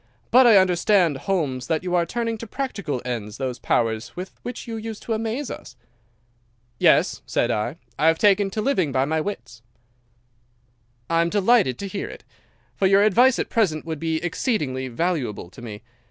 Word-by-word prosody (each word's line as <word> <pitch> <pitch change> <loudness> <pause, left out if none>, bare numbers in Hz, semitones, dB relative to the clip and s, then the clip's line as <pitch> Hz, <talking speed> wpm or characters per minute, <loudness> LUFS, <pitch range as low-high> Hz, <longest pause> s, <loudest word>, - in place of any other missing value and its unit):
But 250 +1 +7
I 220 -4 +7
understand, 185 -2 +3
Holmes, 140 -5 -2
that 160 +1 0
you 180 -1 -3
are 170 -1 +2
turning 230 -1 -2
to 230 - -7
practical 200 - -4
ends 115 -4 -4
those 130 -2 -3
powers 115 0 -1
with 185 +1 -6
which 245 - -7
you 230 - -4
used 220 -1 -6
to 230 - -2
amaze 225 +5 -3
us?' 130 - -9 1.0
"'Yes,' - - +3
said - - +1
I, 110 +6 -2 0.2
'I 155 - +3
have 165 0 +4
taken 200 0 +3
to 215 +3 -3
living 185 - +1
by 130 0 +1
my 160 +2 0
wits.' 140 - -6 1.5
"'I 165 0 +2
am 170 - +1
delighted 205 - +3
to 200 - -5
hear 195 +1 -5
it, - - -11 0.5
for 195 - +2
your 195 +1 +5
advice 240 +5 +5
at - - -2
present 180 -10 +1
would 160 -2 -4
be 160 0 -1
exceedingly 150 - -1
valuable 130 - -2
to - - -13
me. 110 -3 -8
175 Hz, 180 wpm, -23 LUFS, 130-215 Hz, 1.5 s, But